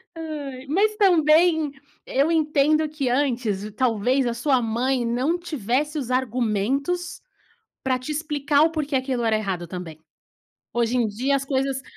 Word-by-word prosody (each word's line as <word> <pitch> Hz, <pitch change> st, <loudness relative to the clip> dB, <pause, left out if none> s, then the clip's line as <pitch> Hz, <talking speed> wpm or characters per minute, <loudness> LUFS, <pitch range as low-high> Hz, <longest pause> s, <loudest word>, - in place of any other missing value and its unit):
Aí. 290 Hz, -5 st, -6 dB
Mas 405 Hz, +8 st, +2 dB
também, 320 Hz, -5 st, +4 dB, 0.3 s
eu 280 Hz, +5 st, +1 dB
entendo 310 Hz, -1 st, +2 dB
que 295 Hz, -4 st, -2 dB
antes 240 Hz, -6 st, -1 dB
talvez 250 Hz, +2 st, +1 dB
a 240 Hz, -, 0 dB
sua 255 Hz, +2 st, +1 dB
mãe 240 Hz, +3 st, 0 dB
não 255 Hz, +9 st, 0 dB
tivesse 295 Hz, -, -2 dB
os 255 Hz, -4 st, -3 dB
argumentos 255 Hz, -, -1 dB, 0.6 s
para 260 Hz, -1 st, +1 dB
te 255 Hz, +4 st, -6 dB
explicar 295 Hz, -1 st, +1 dB
o 320 Hz, -, +3 dB
porquê 300 Hz, -3 st, -2 dB
aquilo 260 Hz, -2 st, -1 dB
era 225 Hz, -1 st, +2 dB
errado 185 Hz, -5 st, -3 dB
também. 170 Hz, -3 st, -7 dB, 0.7 s
Hoje 235 Hz, 0 st, 0 dB
em 235 Hz, -2 st, +2 dB
dia 255 Hz, +7 st, 0 dB
as 275 Hz, -, -2 dB
coisas 270 Hz, -1 st, -1 dB
270 Hz, 145 wpm, -23 LUFS, 240-305 Hz, 0.7 s, também